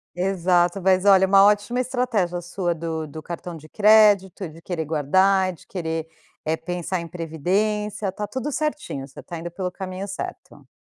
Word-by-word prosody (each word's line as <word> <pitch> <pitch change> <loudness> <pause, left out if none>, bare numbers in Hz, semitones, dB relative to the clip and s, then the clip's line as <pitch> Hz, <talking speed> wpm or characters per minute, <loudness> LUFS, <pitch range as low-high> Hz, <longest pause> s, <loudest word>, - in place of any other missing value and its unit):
Exato, 180 0 +1
mas 190 +1 +3
olha, 190 -1 +7
uma 195 +1 +6
ótima 210 +4 +2
estratégia 230 -9 0
sua 175 0 -2
do 160 -1 -4
do 155 +2 -9
cartão 175 0 -6
de 155 0 -13
crédito, 205 -3 +4
de 165 +2 -14
querer 170 -2 -3
guardar, 185 +5 +2
de - - -17
querer, 160 -3 -3 0.4
eh, 160 +1 0
pensar 175 +1 -3
em 170 - -6
previdência, 195 +6 -1
está 205 +2 -4
tudo 260 +6 -4
certinho, 295 - -3
você 135 - -12
está 170 - -7
indo 175 +1 -5
pelo 180 +1 -4
caminho 190 0 -6
certo. 195 - -8
185 Hz, 165 wpm, -23 LUFS, 170-200 Hz, 0.4 s, olha